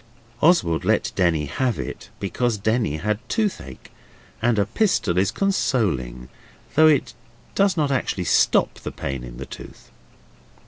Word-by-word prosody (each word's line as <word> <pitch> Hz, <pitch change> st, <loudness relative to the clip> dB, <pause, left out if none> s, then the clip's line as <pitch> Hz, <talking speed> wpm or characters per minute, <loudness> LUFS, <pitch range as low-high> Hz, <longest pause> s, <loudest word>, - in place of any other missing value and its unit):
Oswald 145 Hz, -, +3 dB
let -, -, +1 dB
Denny 85 Hz, -5 st, +1 dB
have 120 Hz, -, -1 dB
it, -, -, -6 dB
because 115 Hz, +3 st, -1 dB
Denny 110 Hz, -5 st, 0 dB
had 105 Hz, +4 st, -1 dB
toothache, 195 Hz, -, -3 dB, 0.5 s
and 115 Hz, -1 st, +2 dB
a 100 Hz, -, +3 dB
pistol 150 Hz, -, +1 dB
is 95 Hz, -, +2 dB
consoling 85 Hz, -, -1 dB, 0.5 s
though 155 Hz, +1 st, +6 dB
it 135 Hz, -6 st, +2 dB, 0.4 s
does 195 Hz, -3 st, +2 dB
not 145 Hz, -3 st, +1 dB
actually 115 Hz, -8 st, -1 dB
stop -, -, +2 dB
the -, -, -6 dB
pain 65 Hz, -2 st, -5 dB
of -, -, -9 dB
the 70 Hz, -, -6 dB
tooth. -, -, -12 dB
105 Hz, 140 wpm, -23 LUFS, -, 0.5 s, though